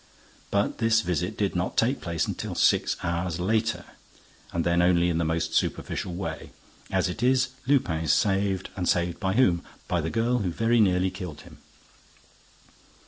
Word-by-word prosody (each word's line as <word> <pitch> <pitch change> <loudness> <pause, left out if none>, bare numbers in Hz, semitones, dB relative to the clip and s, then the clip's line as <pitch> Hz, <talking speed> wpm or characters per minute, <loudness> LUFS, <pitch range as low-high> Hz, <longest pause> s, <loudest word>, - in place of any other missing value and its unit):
But 100 0 0
this 115 0 +3
visit 90 +2 -2
did 100 -3 -1
not 90 +1 -2
take 125 +5 +2
place 85 -3 -1
until - - -4
six - - +2
hours 85 0 -2
later 110 +4 0 0.7
and 85 - -1
then 85 0 +3
only 90 -1 +3
in 85 -1 0
the - - +1
most 80 0 -1
superficial 90 - -1
way. 80 -4 -5 0.4
As - - +1
it 90 - -5
is, 130 +1 +3 0.2
Lupin 85 - +1
is 75 - +3
saved; 95 0 +1
and 90 -2 -1
saved 85 -1 0
by 95 -2 0
whom? 95 -8 +3 0.2
By 90 -2 0
the 80 - -2
girl 120 +4 +1
who 95 -5 -1
very 115 +7 +1
nearly 95 -3 +3
killed 90 -5 -7
him. - - -15
90 Hz, 170 wpm, -26 LUFS, 85-110 Hz, 0.7 s, this